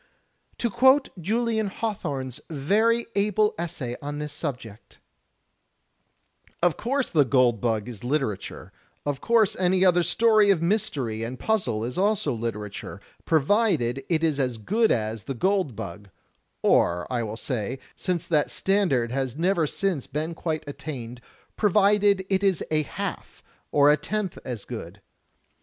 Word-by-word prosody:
To 235 - -1
quote 260 +5 +5
Julian 220 +3 0
Hawthorne's 150 - -4
very 215 +11 +2
able 210 +1 +2
essay 155 -8 -4
on 145 0 -5
this 150 0 -5
subject: 125 -8 -7 1.7
"Of 175 -3 +4
course 270 +3 -1
*The 155 -4 +5
Gold 125 -4 +3
Bug' 110 -3 0
is 115 -4 -9
literature; 125 -6 -3 0.3
of 145 -2 -2
course 230 -4 +3
any 185 +1 +3
other 180 -1 +5
story 215 +4 +4
of 195 -4 +4
mystery 145 - -1
and 120 +3 -4
puzzle 190 - 0
is 125 +8 -3
also 200 -8 +1
literature, 105 -3 -5 0.3
provided 155 - +2
it 165 -2 +1
is 155 -3 +1
as 125 -3 0
good 215 - +1
as 110 -2 -1
'The 135 - -4
Gold 185 - +1
Bug,' 100 -1 -7 0.3
— - - -47
or 85 0 +3
I 120 - 0
will 110 -1 -4
say, 125 0 -3 0.2
since 180 -3 -2
that 150 -3 +1
standard 175 - +1
has 135 0 -2
never 170 -1 +2
since 180 -4 -2
been 155 +3 -3
quite 160 -1 -3
attained, 125 -5 -7 0.3
provided 205 -1 +3
it 190 -1 +1
is 195 -3 +2
a 155 0 +3
half 150 - -6 0.3
or 145 0 +6
a 150 - +4
tenth 210 -1 -3
as 120 -5 -6
good. 100 -5 -8
155 Hz, 145 wpm, -25 LUFS, 120-200 Hz, 1.7 s, or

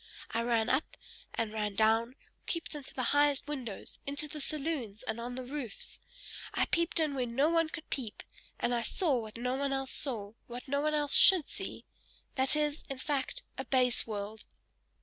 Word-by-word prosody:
I 230 - +1
ran 230 -1 +2
up, 265 +4 0 0.4
and 220 -2 -1
ran 210 -2 -1
down, 225 +3 +3 0.3
peeped 335 -2 -1
into 290 -3 -7
the 255 - -3
highest 290 -1 +3
windows, 255 -9 -5
into 285 +2 0
the 300 0 -6
saloons, 275 -9 -2
and 225 +1 -3
on 245 +1 -4
the 255 - -4
roofs, 255 -5 -4 0.6
I - - +3
peeped 335 0 +2
in 310 -3 +2
where 255 -3 0
no 270 +6 +3
one 330 -1 +3
could 315 0 -7
peep, 235 -7 -3 0.4
and 245 - +1
I 235 - +2
saw 295 - +1
what 220 -1 -7
no 250 +2 -1
one 275 +1 0
else 270 0 -1
saw, 220 -7 -2
what 245 +2 -7
no 280 +1 +1
one 305 0 +2
else 295 -1 +1
should 370 -6 +8
see! - - -5 0.5
This 265 +1 +3
is, 300 0 0
in 270 - -3
fact, 290 - -2 0.2
a - - -1
base 250 -3 +3
world! 210 0 -5
265 Hz, 190 wpm, -32 LUFS, 230-295 Hz, 0.6 s, should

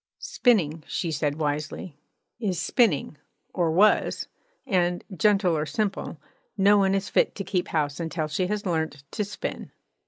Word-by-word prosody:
'Spinning,' 165 - +1
she 170 -4 -2
said 150 -1 -1
wisely, 150 +1 -3 0.4
'is 190 -7 -1
spinning, 175 - +1 0.3
or 175 -2 +1
was; 195 +7 +3 0.4
and, 175 -2 +1
gentle 195 -3 +3
or 155 0 -1
simple, 200 -2 -2 0.4
no 200 +1 +5
one 195 0 +3
is 195 0 -1
fit - - +2
to 195 - -4
keep 185 -1 -1
house 145 -2 -1
until 160 -1 -2
she 165 +4 -1
has 210 +1 -2
learnt 160 -5 -2
to 210 - -1
spin.' 205 +1 -5
175 Hz, 150 wpm, -26 LUFS, 155-200 Hz, 0.4 s, no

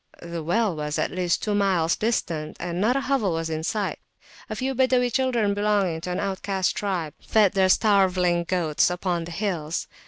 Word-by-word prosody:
The 170 -1 -5
well 190 +4 +1
was 150 0 -3
at - - -1
least 180 -2 -1
two 210 - 0
miles 190 -5 +2
distant, 170 -9 -2
and 175 +1 -3
not 235 +5 +3
a 275 - +1
hovel 255 -10 0
was 165 0 -2
in 160 0 -3
sight; 205 +4 -2 0.5
a - - -3
few 265 +1 -2
Badawi 255 -2 +2
children 240 -6 +1
belonging 200 -5 0
to 180 - -5
an 180 - -2
outcast 195 -1 -1
tribe 180 -7 -2
fed 210 -4 +3
their 190 -2 +2
starveling 185 -4 +3
goats 170 -4 +1
upon 180 -1 -2
the 170 - -8
hills. 170 -4 -2
185 Hz, 185 wpm, -24 LUFS, 170-210 Hz, 0.5 s, not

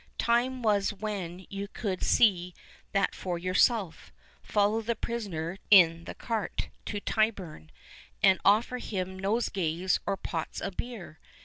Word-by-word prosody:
Time 245 +2 +1
was 205 -2 +2
when 190 -4 -5
you 200 0 -4
could 200 -3 -4
see 180 -6 +3 0.4
that 195 0 +1
for 180 -2 -4
your 185 +2 -3
self, 200 -4 +1 0.3
follow 210 +2 +1
the 230 +1 -1
prisoner 195 -7 -4
in 170 -4 +6
the - - -7
cart 225 -4 -3 0.2
to 205 - -3
Tyburn, 200 - -1 0.5
and 190 -2 +6
offer 230 +5 +3
him 190 -4 -4
nosegays 190 -4 0
or 200 -1 0
pots 165 -3 -4
of 195 - -5
beer. 210 -10 -7
195 Hz, 135 wpm, -29 LUFS, 180-220 Hz, 0.5 s, in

